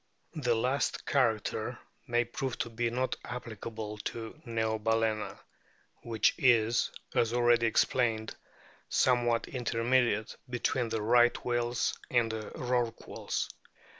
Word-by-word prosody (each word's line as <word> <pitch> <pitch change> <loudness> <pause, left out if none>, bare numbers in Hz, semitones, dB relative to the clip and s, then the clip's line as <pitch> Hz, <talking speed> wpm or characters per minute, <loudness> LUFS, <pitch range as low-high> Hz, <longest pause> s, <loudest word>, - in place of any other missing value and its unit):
The 125 -8 +1
last 130 +5 0
character 115 -6 0 0.3
may 120 0 +2
prove 125 +2 -4
to 120 - -3
be 120 +1 0
not 130 +2 -1
applicable 110 -3 -6
to 115 +1 -5
Neobalcena, 110 -2 0 0.6
which 115 -2 +2
is, 120 -2 +4 0.2
as 115 0 +2
already 120 -1 +4
explained, 115 -1 +1 0.5
some 125 -2 +3
what 115 -1 +1
intermediate 120 -2 +1
between 125 0 0
the 110 -1 -2
Right 120 +2 +4
whales 120 0 0
and 120 -2 +2
the 110 -1 -5
Rorquals. 120 -2 -2
115 Hz, 110 wpm, -31 LUFS, 110-120 Hz, 0.6 s, is